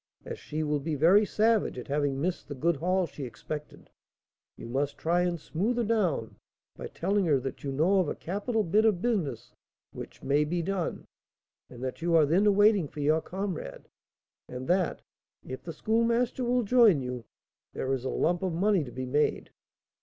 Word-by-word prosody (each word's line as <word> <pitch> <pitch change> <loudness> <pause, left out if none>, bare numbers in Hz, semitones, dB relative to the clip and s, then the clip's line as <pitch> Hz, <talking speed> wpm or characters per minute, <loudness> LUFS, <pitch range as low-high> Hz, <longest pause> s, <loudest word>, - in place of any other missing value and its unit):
As - - -6
she 155 +1 -4
will 150 -1 0
be 155 +2 -3
very 185 +9 +5
savage 220 - +2
at 125 - -7
having 140 -1 0
missed 175 +4 -2
the 145 - -6
good 165 +4 +1
haul 185 +4 +1
she 145 -3 -8
expected, 150 +5 -8 0.7
you - - -8
must 140 +4 -2
try 175 +2 +1
and 175 -1 -1
smooth 205 +11 -2
her 240 - +1
down 190 - 0 0.4
by - - -7
telling 195 +2 0
her 145 -4 +3
that 130 0 -6
you 140 - -3
know 170 +8 +3
of 175 -5 +1
a - - -3
capital 210 +5 -2
bit 205 +5 +2
of 215 -5 +3
business 180 - -2 0.4
which - - -10
may 145 +2 +2
be 170 +3 -2
done, 190 -1 -3 0.6
and 125 0 -10
that 130 +3 -4
you 170 0 +2
are 160 -2 +6
then 195 +7 +3
waiting 205 -5 +4
for 150 - -11
your 155 +2 +2
comrade, 185 - -5 0.6
and 125 +1 -6
that, 180 -1 +1 0.4
if 130 - -7
the 165 - -7
Schoolmaster 230 +7 0
will 245 0 +1
join 225 - +5
you, 125 -1 -5 0.5
there 135 0 -2
is 130 -2 -2
a 130 - -2
lump 175 +2 0
of 185 -3 -1
money 190 0 +2
to 125 - -9
be 130 +1 -5
made." 145 +4 0
170 Hz, 190 wpm, -28 LUFS, 145-200 Hz, 0.7 s, are